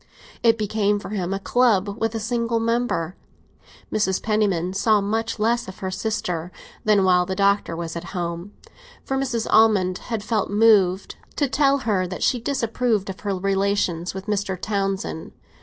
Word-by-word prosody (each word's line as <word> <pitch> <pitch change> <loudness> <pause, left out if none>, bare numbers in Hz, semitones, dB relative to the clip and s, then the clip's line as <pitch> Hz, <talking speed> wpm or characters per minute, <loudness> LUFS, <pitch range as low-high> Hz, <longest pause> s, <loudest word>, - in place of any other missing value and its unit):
It 230 -1 +4
became 210 -1 +1
for 205 - -7
him 190 -3 -2
a 195 - 0
club 205 -3 +2
with 225 0 0
a - - -1
single 230 +1 -1
member. 230 -7 -1 0.8
Mrs. 190 -3 +1
Penniman 200 -5 +1
saw 215 +2 +3
much 225 +3 -2
less 230 +1 +1
of 190 - -9
her 190 -2 -4
sister 185 -4 -3 0.3
than 210 -2 +4
while 180 -1 +3
the 190 - -2
Doctor 200 -3 +2
was 165 0 -5
at 170 +1 -5
home; 170 +2 -4 0.5
for 270 - -2
Mrs. 260 -4 -1
Almond 205 -5 +4
had 225 -3 -2
felt 215 -2 -1
moved 205 -3 +3 0.2
to 285 - +1
tell 275 +1 +3
her 190 -5 +1
that 180 - -5
she 245 - +2
disapproved 230 -5 0
of 190 - -11
her 200 -2 -2
relations 195 -2 0
with 190 0 -6
Mr. 200 -3 -2
Townsend. 195 -5 -3
205 Hz, 165 wpm, -23 LUFS, 185-225 Hz, 0.8 s, It